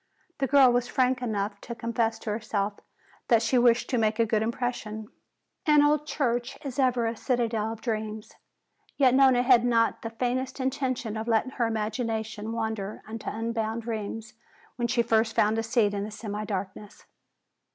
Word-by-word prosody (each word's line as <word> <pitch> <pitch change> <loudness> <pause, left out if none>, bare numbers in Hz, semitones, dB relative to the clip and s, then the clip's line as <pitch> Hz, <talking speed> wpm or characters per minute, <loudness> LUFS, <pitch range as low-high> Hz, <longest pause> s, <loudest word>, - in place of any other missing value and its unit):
The 270 - +1
girl 270 -2 +6
was 245 0 +1
frank 255 0 +1
enough 205 -3 -2
to 235 - -7
confess 230 -1 -1
to 215 - -5
herself 210 -1 -2 0.5
that 230 -2 +4
she 245 +3 +3
wished 240 0 +4
to 250 - +2
make 215 -1 +1
a 230 - +3
good 215 -1 +1
impression. 225 -2 -3 0.6
An 300 -1 +6
old 300 0 +2
church 245 -3 -1
is 275 0 -5
ever 250 -3 +2
a 225 +1 -1
citadel 225 -3 -1
of 225 -1 -8
dreams. 220 -2 -4 0.6
Yet 260 -3 +5
Nona 260 -2 +5
had 250 -2 +5
not 230 -2 +2
the 225 - -4
faintest 255 +3 -2
intention 260 -4 -2
of 220 +1 -4
letting 230 +2 +1
her 240 -3 0
imagination 220 0 -3
wander 220 -3 -3
into 225 +1 -5
unbounded 225 0 -3
realms 220 0 -4 0.4
when 240 -1 -1
she 235 0 +2
first 225 -1 +1
found 215 +2 +3
a - - -1
seat 225 -2 +2
in 200 0 -2
the 210 - -5
semi 210 -1 -5
darkness. 200 0 -6
230 Hz, 170 wpm, -27 LUFS, 220-245 Hz, 0.6 s, girl